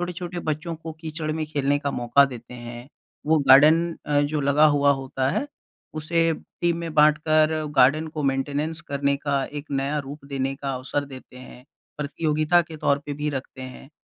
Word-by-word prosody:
छोटे-बच्चों 170 -2 -4
को 160 0 -8
कीचड़ 155 -1 -4
में 155 0 -2
खेलने 145 -2 0
का 145 -1 -2
मौका 120 +2 +3
देते 125 -2 -10
हैं, 120 0 -9 0.4
वो 160 +1 +4
गार्डन 155 +5 +6
अ, 145 -1 +2
जो 145 +1 -1
लगा 140 +2 +4
हुआ 145 -1 +4
होता 135 -1 -2
है, 280 - -1 0.5
उसे 165 +2 +1 0.3
टीम 170 -1 +1
में 165 -2 -5
बाँटकर, 155 +1 +3
गार्डन 145 +5 +4
को 155 -1 -5
मेंटेनेंस 145 +4 -1
करने 140 0 0
का, 140 -1 -1
एक 145 0 -7
नया 140 +2 -1
रूप 140 +1 -9
देने 135 -1 -3
का 135 -1 -4
अवसर 135 +3 -3
देते 130 -2 -12
हैं, 125 -1 -13 0.3
प्रतियोगिता 155 +3 +1
के 165 -2 -10
तौर 140 -1 +1
पे 145 - -4
भी 150 +1 -3
रखते 135 -1 -6
हैं। 130 +1 -10
145 Hz, 175 wpm, -24 LUFS, 135-155 Hz, 0.5 s, गार्डन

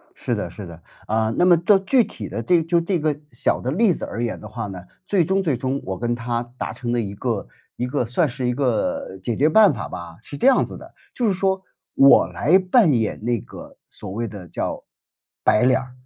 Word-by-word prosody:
是 - - -3
的 - - -2
是 100 - -9
的。 85 -1 -11 0.2
啊， 110 0 0
那 180 - +4
么 180 -1 +7
到 195 +5 +4
具 235 +6 +3
体 - - -7
的 - - -4
这 180 -2 +3
个 165 - +1
就 170 0 +3
这 175 +1 -1
个 150 -1 0
小 120 -5 -1
的 125 - -2
例 195 - +3
子 - - -7
而 115 +3 -4
言 120 - -3
的 105 - -9
话 110 +1 -5
呢， 95 -2 -7 0.3
最 190 -3 +2
终 190 +4 0
最 155 -7 +1
终 130 +2 -2
我 95 -1 -4
跟 120 0 -1
他 120 0 -2 0.2
达 - - -4
成 120 -2 -4
的 120 - +1
一 100 -3 -3
个 110 - -3 0.3
一 125 - -2
个 125 +1 -1
算 130 +8 +1
是 125 -1 -3
一 125 - +1
个 120 -7 -1
解 115 +4 -2
决 145 - +3
办 210 +4 +6
法 - - -5
吧， 85 -1 -8
是 140 - -9
这 250 - +2
样 270 - +5
子 - - -9
的： - - -14 0.2
就 240 - 0
是 200 - +2
说 190 0 0 0.3
我 135 0 +6
来 175 +6 +3
扮 190 -1 +4
演 110 -3 -1
那 120 0 0
个 - - -12
所 - - -10
谓 115 +4 -3
的 100 -5 -9
叫 - - -4 0.6
白 105 - +4
脸 130 +1 +4
儿， 130 -1 -9
130 Hz, 260 characters per minute, -22 LUFS, 115-180 Hz, 0.6 s, 么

